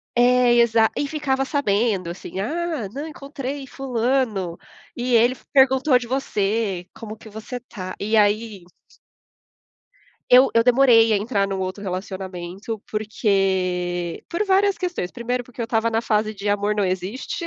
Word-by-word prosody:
É 245 0 +4
exa 225 -1 +4
e 285 - -1
ficava 275 -3 -1
sabendo, 215 - 0
assim. 180 +1 -7
Ah, 315 - -2
não 280 +9 -6
encontrei 280 -2 -6
fulano 245 -8 -1 0.4
e 245 0 0
ele 240 +3 +4 0.2
perguntou 265 -1 +4
de 245 - -5
você 210 -6 -1
como 220 -1 -9
que 220 - -13
você 220 +4 -7
tá 185 -6 -8
e 215 +2 0
aí 210 -1 +1 1.7
Eu, 255 +2 +7
eu 230 - +4
demorei 240 -2 +5
a - - +3
entrar 200 -1 0
num 195 -1 -3
outro 185 +2 -4
relacionamento, 190 +2 -5
porque 190 -5 -1
por 340 +5 -1
várias 390 0 +3
questões. 350 - -3
Primeiro, 245 +1 -3
porque 245 0 -9
eu - - -1
estava 225 0 +1
na 225 0 0
fase 215 -1 0
de 200 0 -6
amor 205 +1 +1
não 205 -1 +1
existe. 190 - -3
225 Hz, 150 wpm, -22 LUFS, 200-255 Hz, 1.7 s, Eu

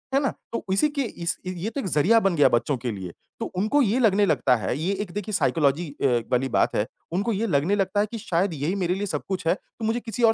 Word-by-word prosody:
है - - +5
ना? 275 - +1 0.2
तो - - -2
इसी 195 +10 +4
के 290 -1 -2
इस 170 -7 -3
ये 185 +3 -3
तो 280 - -5
एक 195 - -4
ज़रिया 185 +8 +4
बन 195 -4 +2
गया 145 - +5
बच्चों 120 +4 +1
के 120 0 -3
लिए, 95 -4 -6 0.3
तो - - -2
उनको 215 +10 +1
ये 230 -1 +2
लगने 205 -4 +4
लगता 130 -8 +3
है 105 +2 -2
ये 170 +6 -1
एक 200 -4 -6
देखिए 205 +1 -4
साइकोलॉजी 160 -4 +2 0.2
अ, - - +4 0.3
वाली 130 +1 +1
बात - - +1
है, 105 - +1 0.3
उनको 200 +7 0
ये 215 +3 -1
लगने 170 +3 +2
लगता 195 0 0
है - - +2
कि 230 - -4
शायद 180 -1 0
यही 155 +5 -2
मेरे 180 -3 0
लिए 200 +2 -2
सब - - -3
कुछ 190 -3 -3
है, - - +5
तो 225 - -9
मुझे 225 +2 +1
किसी 230 0 -4
और 225 -1 +6
190 Hz, 265 wpm, -25 LUFS, 155-220 Hz, 0.3 s, और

